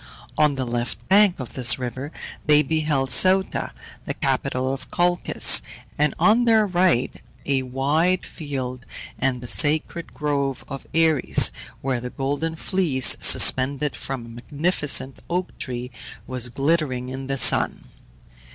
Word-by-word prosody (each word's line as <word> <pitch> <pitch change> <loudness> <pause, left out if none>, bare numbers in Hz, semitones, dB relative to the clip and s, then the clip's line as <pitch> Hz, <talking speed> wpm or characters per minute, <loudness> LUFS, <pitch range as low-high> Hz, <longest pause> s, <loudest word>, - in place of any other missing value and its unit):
On 150 -2 +1
the 130 -1 -4
left 120 0 -5
bank 195 -3 +4
of 130 - -8
this 125 -2 +3
river 130 +3 -6 0.4
they 150 0 +4
beheld 150 -3 -2
Ceuta, 190 +6 +3 0.3
the - - -5
capital 130 +1 -2
of 130 -1 -9
Colchis; 175 0 +3 0.3
and 150 -1 0
on 230 +3 +3
their 220 -2 +3
right 180 -9 0 0.3
a 135 -1 0
wide 145 +8 -1
field, 130 -5 -7 0.4
and 130 -2 -1
the 125 - -9
sacred 155 +5 +1
grove 140 -3 -3
of 135 -1 -9
Ares, 160 -4 +4 0.3
where 130 -3 -3
the 125 - -6
Golden 145 +5 -4
Fleece, 160 -7 +2
suspended 140 +2 +4
from 130 -3 -5
a - - -13
magnificent 140 +2 -2
oak 180 +1 -3
tree, 125 0 -6 0.3
was 125 -1 0
glittering 135 -2 -2
in 130 +1 -7
the 135 0 -3
sun. - - +3
140 Hz, 135 wpm, -22 LUFS, 130-160 Hz, 0.4 s, bank